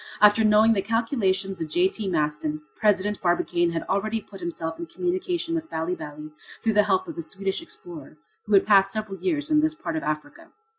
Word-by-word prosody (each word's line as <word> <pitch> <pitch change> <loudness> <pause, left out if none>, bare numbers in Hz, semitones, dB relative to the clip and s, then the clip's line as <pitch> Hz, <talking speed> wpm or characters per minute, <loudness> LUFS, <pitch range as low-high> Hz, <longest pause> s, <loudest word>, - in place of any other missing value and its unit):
After 210 +1 +6
knowing 215 +1 +5
the 200 - +1
calculations 200 -4 0
of 160 - -3
J.T. 190 +6 +1
Maston, 150 -2 -1
President 210 -1 +1
Barbicane 175 0 +1
had 165 - -2
already 215 +3 -1
put 195 -2 -13
himself 165 -2 -4
in 340 - -5
communication 355 0 -2
with 325 -1 -3
Bali 160 +3 -2
Bali 150 -2 -8 0.3
through 225 - +2
the 210 0 +4
help 190 -1 +2
of - - -7
a - - -1
Swedish 195 - -3
explorer, 165 - -10 0.3
who 210 - -1
had 195 - +5
passed 195 -2 +5
several 210 -2 -4
years 310 -4 -1
in 305 0 +5
this 315 0 +1
part 170 - -4
of 160 - -1
Africa. 155 - -5
195 Hz, 195 wpm, -25 LUFS, 170-225 Hz, 0.3 s, After